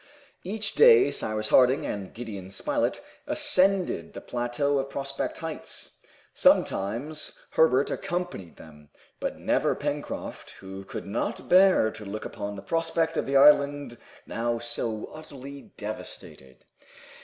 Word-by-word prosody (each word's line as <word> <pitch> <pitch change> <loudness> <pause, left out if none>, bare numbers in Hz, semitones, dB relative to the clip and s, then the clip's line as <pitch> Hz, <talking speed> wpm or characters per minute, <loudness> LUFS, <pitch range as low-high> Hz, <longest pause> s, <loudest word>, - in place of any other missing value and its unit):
Each 205 +2 -2
day 455 -4 +7
Cyrus 110 0 -2
Harding 130 +1 +5
and 100 -2 -4
Gideon 105 -6 -7
Spilett 95 - -1 0.3
ascended 185 - +2
the - - -6
plateau 125 +4 -1
of 135 0 -3
Prospect 140 0 -3
Heights. 160 -1 -6 0.3
Sometimes 120 +11 +1
Herbert 140 -4 +3
accompanied 175 - -4
them, 75 -2 -15 0.3
but - - -3
never - - +1
Pencroft, - - -5
who 95 0 -8
could - - -7
not - - -3
bear 185 - +5
to 110 - -9
look 105 +1 -6
upon 100 0 -5
the 95 - -9
prospect 165 0 0
of - - -1
the 135 0 +3
island 140 -3 +4 0.3
now 120 +1 -1
so 115 -2 -3
utterly 140 -2 -10
devastated. 105 - -9
135 Hz, 125 wpm, -27 LUFS, 105-160 Hz, 0.3 s, day